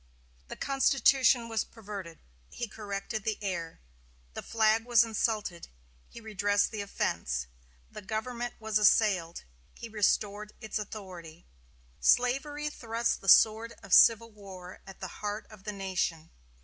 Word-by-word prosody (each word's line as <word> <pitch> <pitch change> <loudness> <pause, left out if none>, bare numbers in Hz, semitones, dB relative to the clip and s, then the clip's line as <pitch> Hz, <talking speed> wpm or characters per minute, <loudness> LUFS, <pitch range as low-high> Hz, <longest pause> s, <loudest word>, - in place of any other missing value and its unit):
The - - -7
Constitution 270 -2 +3
was 225 -1 -1
perverted; 200 -7 -9 0.3
he 240 - -5
corrected 210 0 -5
the 220 0 -1
error. 175 -5 -4 0.5
The - - -5
flag 225 0 +2
was 235 -1 +5
insulted; 215 -5 -2 0.4
he - - -11
redressed 205 -2 0
the 215 -2 -4
offense. 65 - -2 0.5
The - - -9
government 235 +4 -4
was 220 -1 0
assailed? 190 -5 +3 0.3
he 230 - -9
restored 210 0 0
its 220 -1 -4
authority. 180 -6 -9 0.5
Slavery 275 - +2
thrust 230 -2 -2
the 195 - -2
sword 225 +3 +5
of 195 -2 -4
civil 230 0 +6
war 190 -3 -11
at 195 - -12
the - - -4
heart 210 +1 -3
of 205 -2 -15
the 210 - -3
nation? 185 -5 -3
210 Hz, 135 wpm, -29 LUFS, 195-230 Hz, 0.5 s, civil